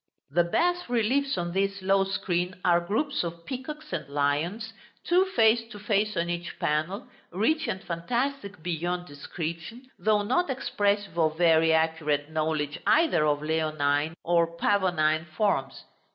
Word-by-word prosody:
The 175 +4 +3
bas 350 - 0
reliefs 245 +2 +1
on 175 -1 -2
this 195 +1 -1
low 195 0 +3
screen 180 -2 -2
are 175 -1 +5
groups 250 - -1
of 170 0 -6
peacocks 300 +4 -7
and 140 - -4
lions, 155 +11 -1 0.3
two 360 +2 +3
face 225 0 +5
to 210 - -8
face 210 -1 0
on 170 +1 0
each 175 0 -4
panel, 155 +9 -1 0.3
rich 225 - +1
and 190 - -3
fantastic 205 - -3
beyond 175 +1 -2
description, 170 - -7
though 210 -1 +2
not 270 +11 +1
expressive 205 -7 -1
of 155 -1 +2
very 165 -2 +4
accurate 160 -2 +1
knowledge 155 -1 -1
either 315 - +4
of 145 0 0
leonine 155 -1 0
or 170 -1 +1
pavonine 170 -5 +2
forms. 195 -11 0
175 Hz, 140 wpm, -27 LUFS, 160-220 Hz, 0.3 s, are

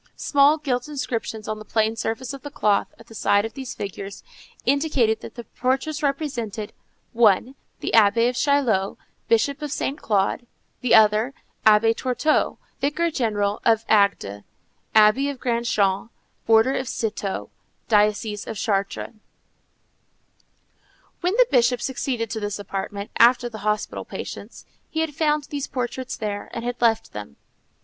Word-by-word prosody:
Small 285 +2 +4
gilt 260 -4 -2
inscriptions 235 -6 -4
on 215 0 -3
the - - -8
plain 220 +1 0
surface 225 +4 -3
of 275 - -8
the 290 - -7
cloth 210 -7 +1
at - - -15
the - - -15
side 205 -1 +2
of 225 - -6
these 265 -2 -7
figures 195 0 -7 0.4
indicated 270 -6 +2
that - - -10
the 240 - -7
portraits 270 +6 -2
represented, 245 -8 -3 0.4
one 230 +2 +3 0.3
the - - -2
Abbé 225 +2 +5
of 250 - -1
Chaliot, 250 -10 +1 0.3
bishop 255 +6 +2
of 295 -2 -4
Saint 280 0 -3
Claude; 210 +3 0 0.3
the 250 - +4
other, 220 +4 +4 0.3
the - - +7
Abbé 225 +2 +4
Tourteau, 260 +6 0 0.2
vicar 330 +4 0
general 210 -6 -1
of 225 -1 +3
Agde, 200 - +2 0.5
abbé 220 +6 +5
of 280 -3 -6
Grand 235 -1 -1
Champ, 200 0 +1 0.4
order 225 +4 +5
of 260 - -2
Cîteaux, 210 -4 -3 0.4
diocese 210 0 +1
of 220 - -5
Chartres. 200 0 -1 2.1
When 360 +4 0
the - - +6
Bishop 245 -1 +3
succeeded 245 -4 -2
to 220 - -2
this 205 -1 -3
apartment, 200 +1 -5
after 240 +1 +5
the 220 -2 -8
hospital 210 +1 -2
patients, - - -8 0.2
he 320 - -1
had 320 -2 -2
found 300 -1 +1
these 285 -2 -3
portraits 255 +1 -4
there, 205 -2 -4
and 230 - -4
had 245 0 -4
left 225 -1 +2
them. 105 -9 -8
230 Hz, 150 wpm, -23 LUFS, 210-270 Hz, 2.1 s, the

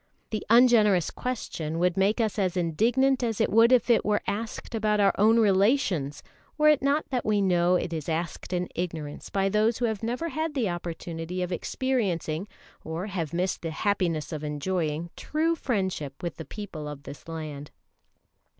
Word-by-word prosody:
The 215 -2 -2
ungenerous 220 -7 +5
question 165 -10 -4
would 175 0 +2
make 195 +4 +2
us 220 -2 0
as 185 -2 0
indignant 240 - +2
as 230 -3 -1
it - - +2
would 230 +3 +6
if 250 -3 +4
it 235 -2 +4
were 210 0 +1
asked 225 +3 -4
about 215 -1 +1
our 200 -1 +4
own 220 +3 +5
relations, 195 - +2 0.3
were 305 0 +5
it 300 -2 +4
not 280 +3 +1
that 250 -2 0
we 215 -1 +2
know 180 -2 +3
it 175 -1 -1
is 160 -1 -4
asked 165 +3 -3
in 180 -1 -1
ignorance 160 -4 -5
by 195 -1 +1
those 215 +3 +2
who 245 - 0
have 220 -3 -2
never 245 +9 -2
had 315 -1 -3
the 235 -7 +1
opportunity 175 0 -4
of 180 - -4
experiencing, 190 -6 -1 0.4
or 160 +4 -4
have 175 -7 -3
missed 180 +2 -1
the 165 - -3
happiness 170 -4 -1
of 155 -1 -5
enjoying, 155 +2 -2
true 320 +2 0
friendship 190 - -3
with 170 -2 -4
the 160 - -7
people 185 -8 -7
of 145 -1 -8
this 140 +3 -10
land. 155 -3 -6
190 Hz, 175 wpm, -27 LUFS, 165-225 Hz, 0.4 s, would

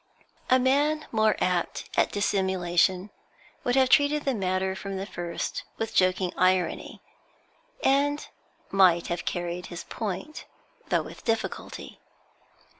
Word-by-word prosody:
A 255 - +6
man 290 +4 +2
more 220 -1 +3
apt 180 -2 -1
at - - +3
dissimulation 190 -1 +1 0.5
would 245 - +1
have 260 -1 +4
treated 290 +1 +4
the 270 - +2
matter 190 -2 -1
from 195 0 -5
the 190 - -3
first 175 -4 -4 0.2
with 225 0 -3
joking 185 -1 +2
irony, 185 -1 +1 0.8
and 285 +2 +2 0.4
might 180 -3 +4
have 175 0 -3
carried 175 0 -3
his 175 - -7
point, 225 - -5 0.4
though - - +1
with - - -11
difficulty. 225 -1 -3
195 Hz, 120 wpm, -27 LUFS, 180-255 Hz, 0.8 s, A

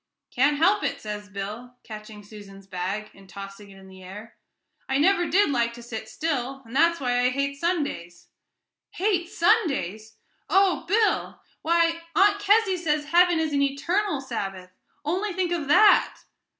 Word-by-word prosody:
"Can't 280 +4 +2
help 385 +7 +3
it," - - -2
says 210 -1 -7
Bill, 210 +5 -7
catching 215 -1 -10
Susan's 200 -2 -13
bag, 195 +3 -4
and 195 -1 -18
tossing 195 +1 -10
it 195 - -15
in 190 0 -15
the 190 0 -14
air; 205 +5 -11 0.5
"I 265 - +1
never 350 +3 +3
did 360 +1 +3
like 235 -3 0
to 240 0 -11
sit 220 -2 -7
still, 270 -4 -3
and 230 +3 -11
that's 335 +3 +3
why 245 -2 0
I 250 0 +3
hate 280 +2 -2
Sundays." 285 - -3 0.7
"Hate 365 -3 0
Sundays! 270 - 0 0.3
Oh, 375 -1 +2
Bill! 430 +4 +1 0.2
Why, 335 0 +1
Aunt 405 +1 +4
Kezzy 410 -2 +3
says 305 -3 -1
heaven 350 +1 +4
is 315 -2 -1
an 280 - +1
eternal 295 +5 0
Sabbath 195 -8 -6 0.3
only 375 +6 -1
think 355 -1 -1
of 330 -5 -2
that!" 415 +8 +4
275 Hz, 160 wpm, -25 LUFS, 210-345 Hz, 0.7 s, Aunt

